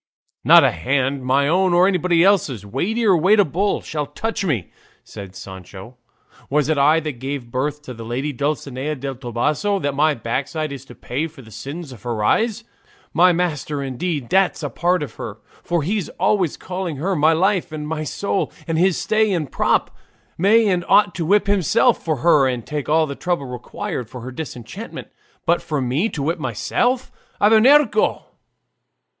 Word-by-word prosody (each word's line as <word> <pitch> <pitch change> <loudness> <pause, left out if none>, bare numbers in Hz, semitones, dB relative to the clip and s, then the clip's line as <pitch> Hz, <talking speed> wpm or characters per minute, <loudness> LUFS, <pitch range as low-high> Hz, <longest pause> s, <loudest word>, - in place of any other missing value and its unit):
"Not - - +8
a - - +4
hand, 135 +9 -1
my 135 +2 +2
own 180 +2 +2
or 180 +2 +5
anybody 180 -3 +2
else's, 150 - +2
weighty 195 - -1
or 195 -4 +5
weighable, 195 +1 +2
shall 150 -2 -3
touch 225 +9 -3
me," 135 - -2 0.3
said 95 -2 -10
Sancho. 95 +5 -10 0.5
"Was 150 +1 +1
it 155 - +2
I 150 +3 +5
that 150 -6 -5
gave 135 -2 -5
birth 145 +4 -2
to 130 - -8
the 115 -1 -9
lady 130 +6 -3
Dulcinea 140 +1 -2
del 135 0 -5
Toboso, 135 - -1
that 145 -7 -2
my 150 +2 +2
backside 140 +7 -3
is 135 -1 -8
to 120 - -13
pay 145 +6 -3
for 150 -4 -14
the 110 - -15
sins 145 +5 -7
of 120 -6 -12
her 115 -2 -3
eyes? 225 - +1 0.5
My 180 +3 +5
master, 150 -5 -2
indeed, 140 +1 -3
that's 190 -1 +2
a 145 - -3
part 175 +4 +1
of 130 -6 -7
her - - -6 0.2
for, 170 -3 -1
he's 195 +3 -2
always 190 -7 +1
calling 180 -3 -4
her 180 +8 -1
'my 155 +1 +4
life' 185 +2 +1
and 150 -1 -5
'my 155 0 -3
soul,' 200 +6 -2 0.2
and 165 -1 0
his 185 0 +3
stay 215 -1 +1
and 160 -7 -2
prop - - +1 0.4
may 215 +5 +4
and 180 -3 +1
ought 205 -3 +5
to 175 -3 -3
whip 205 +2 +4
himself 205 - +2
for 160 -2 0
her 150 -5 +5
and 125 -3 -3
take 150 -2 -4
all 160 +1 +4
the 140 - -5
trouble 175 -1 -2
required 125 - -5
for 125 - -9
her 130 +2 -7
disenchantment. 145 - -8 0.4
But 170 0 +2
for 150 -3 -2
me 135 - 0
to 145 - -4
whip 165 +4 -1
myself! 240 - -1 0.3
Abernuncio!" 235 +8 +4
155 Hz, 180 wpm, -21 LUFS, 135-185 Hz, 0.5 s, Not